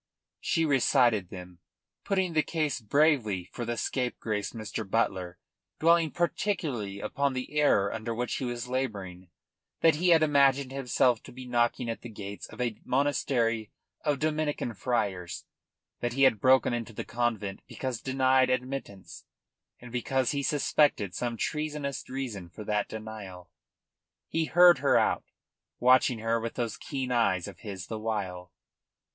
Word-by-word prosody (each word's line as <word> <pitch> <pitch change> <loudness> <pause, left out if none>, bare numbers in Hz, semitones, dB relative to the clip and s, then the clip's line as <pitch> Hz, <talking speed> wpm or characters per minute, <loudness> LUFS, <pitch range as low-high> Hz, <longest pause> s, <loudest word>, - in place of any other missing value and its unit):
She 165 - +1
recited 125 - +3
them, 90 -1 -10 0.5
putting 190 -3 0
the 155 - +4
case 155 -6 -2
bravely 110 - +2
for 120 - -4
the 120 0 -3
scapegrace 115 -6 -2
Mr. 110 -2 -5
Butler, 95 -5 0 0.4
dwelling 165 0 +4
particularly 150 - -2
upon 140 +7 -1
the 130 +3 -5
error 100 -9 +3
under 110 +1 -4
which 125 +1 -2
he 130 - -3
was 120 0 -4
labouring, 100 -9 -4 0.5
that 160 -2 +5
he 180 +3 +2
had 165 -2 +6
imagined 140 -3 +3
himself 125 -3 +2
to - - -12
be 130 +1 -9
knocking 120 0 +1
at 115 - -4
the 120 - -8
gates 100 -2 -7
of - - -13
a 120 -4 -2
monastery 120 -5 +1 0.3
of 150 -2 +1
Dominican 155 -4 -1
friars, 95 -8 -2 0.5
that 120 0 -2
he 135 +2 +2
had 115 -6 +4
broken 130 -1 +4
into 115 -1 -4
the - - -5
convent 110 -5 -2
because 130 -4 -4
denied 130 0 +3
admittance, 125 -6 -4 0.5
and 120 -1 -11
because 130 +1 0
he 140 -1 -1
suspected 140 -8 +2
some 120 +2 -3
treacherous 150 0 -3
reason 120 -9 -5
for 105 - -9
that 105 0 -1
denial. 105 -5 -8 0.8
He 165 0 0
heard 175 -1 +6
her 140 - +4
out, - - +1 0.5
watching 125 -1 +5
her 115 +1 0
with 115 0 -5
those 120 -3 -2
keen 135 -3 -4
eyes 95 -7 +2
of - - -10
his 100 -4 -7
the 110 +2 -5
while. 95 -5 -3
120 Hz, 150 wpm, -29 LUFS, 110-140 Hz, 0.8 s, had